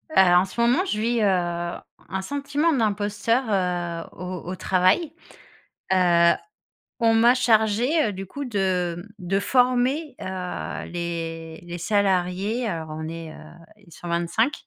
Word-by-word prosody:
Heu, - - +6
en 180 +1 +5
ce 195 +5 -9
moment 250 +11 +3
je 215 - -2
vis, 230 +1 +1
heu, 210 - +4 0.8
un 190 - -2
sentiment 285 - 0
d'imposteur, 215 +1 +1
heu, 175 -4 -1
au 180 0 -5
au - - -3
travail, 185 - +2 0.8
heu, 175 -2 +5 0.7
on 230 -1 +4
m'a 235 +2 +5
chargé, 240 +4 +3
heu, - - -3
du 195 +1 -6
coup 285 +9 -6
de, 190 -7 0
hem, 175 +4 -9
de 190 +2 0
former, 255 +6 +1
heu, 185 -1 -5
les 165 -2 -5
les 175 0 -7
salariés. 195 +4 0
Alors, 165 -5 -4
on 155 +1 -5
est, 165 -1 -7
heu, - - -11 0.4
eh, 205 -4 -21
125, 175 - -1
195 Hz, 145 wpm, -24 LUFS, 175-235 Hz, 0.8 s, Heu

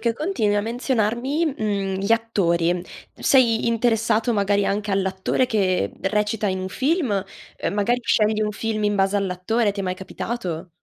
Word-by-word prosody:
che 235 -1 +1
continui 290 - 0
a 205 - +2
menzionarmi, 245 +6 -1
uhm, 200 -3 -1
gli 200 +4 0
attori. 175 -6 +1 0.3
Sei 235 -4 +3
interessato 230 0 +1
magari 200 0 +2
anche 205 +1 -1
all'attore 190 +5 0
che 185 - +1
recita 210 +1 0
in 190 -1 -1
un 185 - -4
film, 260 - 0 0.3
ehm - - -2
magari 210 +5 +1
scegli 215 -1 +2
un 210 - 0
film 215 0 -2
in 205 0 +1
base 195 +1 +2
all'attore, 200 +3 0
ti 200 - -5
è - - -2
mai 185 -1 -2
capitato? 185 -2 -5
210 Hz, 160 wpm, -23 LUFS, 195-230 Hz, 0.3 s, Sei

